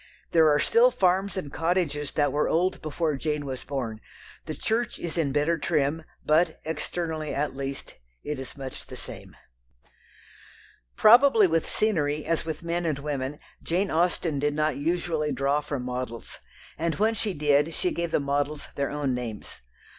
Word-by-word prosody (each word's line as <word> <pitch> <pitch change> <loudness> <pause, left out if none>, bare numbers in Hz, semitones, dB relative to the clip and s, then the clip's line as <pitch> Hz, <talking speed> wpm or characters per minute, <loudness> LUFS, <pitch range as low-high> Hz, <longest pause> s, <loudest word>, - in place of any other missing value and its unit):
There 160 -2 +6
are 145 - +4
still 235 - +5
farms 195 -3 +1
and 145 -7 -5
cottages 160 -4 0
that 145 -1 +1
were 150 - +1
old 180 +3 +1
before 155 0 -1
Jane 150 0 -2
was 130 -2 -5
born. 120 -6 -4 0.5
The - - -3
church 235 +2 -1
is 170 - -4
in 160 -5 +1
better 150 +4 +1
trim, 155 +1 0 0.2
but, 160 +2 +3
externally 160 0 -3
at 145 -1 -1
least, 135 0 -5 0.3
it 150 -2 -3
is 135 +2 -7
much 135 -1 -7
the - - -8
same. - - -8 1.6
Probably 235 -1 +7
with 165 -2 +1
scenery 155 -8 +1
as 165 0 0
with 160 0 -4
men 170 0 -1
and 150 -3 0
women 140 -1 -3 0.2
Jane 185 +4 0
Austen 165 -3 +1
did 145 +1 0
not 155 0 +1
usually 160 0 -1
draw 140 +2 +1
from 145 -3 -4
models, 125 -2 -5 0.4
and 165 0 0
when 220 +2 +2
she 210 -3 -2
did, 145 +1 +3
she 180 +2 -1
gave 170 0 -2
the - - +2
models 145 +1 -1
their 140 -1 -1
own 145 -3 -1
names. 115 - -6
150 Hz, 165 wpm, -27 LUFS, 140-170 Hz, 1.6 s, Probably